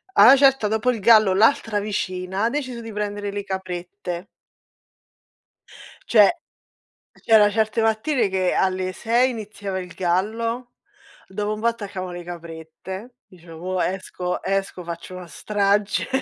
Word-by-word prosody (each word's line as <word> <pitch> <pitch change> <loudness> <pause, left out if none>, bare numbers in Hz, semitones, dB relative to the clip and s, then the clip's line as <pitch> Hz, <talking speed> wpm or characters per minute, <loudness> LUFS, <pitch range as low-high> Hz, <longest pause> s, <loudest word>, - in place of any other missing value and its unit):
A - - +8
'na 270 - +10
certa 270 -4 +4
dopo 220 +3 0
il 230 - -4
gallo 215 -2 +6
l'altra 225 0 +3
vicina 190 -1 -3
ha - - +2
deciso 255 -3 -4
di 225 -1 -8
prendere 205 -1 -3
le 205 0 -4
caprette. 185 -1 -5 1.8
Cioè, 210 -3 +6 0.8
c'era 215 -2 +4
certe 220 +1 0
mattine 225 +1 +1
che 185 -1 0
alle 185 0 0
6 240 +5 +2
iniziava 205 -4 -5
il 180 -1 -8
gallo, 225 +7 -1 0.5
dopo 210 +2 -3
un 215 - -6
po' 230 - +1
attaccavano 200 -5 -4
le 175 0 -7
caprette. 170 +6 -9
Dicevo: 170 -2 -14 0.2
"Mo 185 - 0
esco 180 -1 -3
esco 195 -2 -2
faccio 170 +2 -7
una 180 -1 -8
strage". 205 +4 0
205 Hz, 135 wpm, -22 LUFS, 185-225 Hz, 1.8 s, na